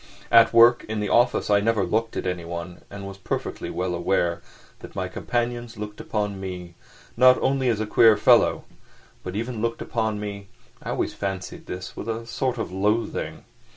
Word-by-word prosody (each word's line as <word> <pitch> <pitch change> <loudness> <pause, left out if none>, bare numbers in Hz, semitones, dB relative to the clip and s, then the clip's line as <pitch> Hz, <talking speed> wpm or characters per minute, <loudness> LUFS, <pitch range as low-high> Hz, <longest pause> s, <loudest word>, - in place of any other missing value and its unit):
At 115 -1 +7
work 115 +1 +6
in 110 -1 -2
the 105 - -2
office 120 -3 +2
I 100 - +5
never 105 -1 +1
looked 110 +5 -1
at - - -3
anyone, 85 -1 -5
and 100 0 -8
was 100 0 -9
perfectly - - -4
well 90 0 -2
aware 85 0 0 0.4
that - - -12
my - - -2
companions 120 -1 -3
looked 105 0 -7
upon 105 -2 -2
me, 90 -2 -6 0.4
not 130 +1 +6
only 135 -2 +1
as 110 -3 0
a 110 - -1
queer 110 0 +5
fellow, - - +4 0.6
but 90 +1 -6
even 115 +1 -3
looked 115 0 -1
upon 110 -2 -2
me—I 100 -2 -9
always - - -1
fancied 95 -2 -5
this—with 90 +4 -7
a 115 +1 -3
sort 125 +1 -2
of 110 - -4
loathing. 105 +5 -1
105 Hz, 170 wpm, -24 LUFS, 95-115 Hz, 0.6 s, At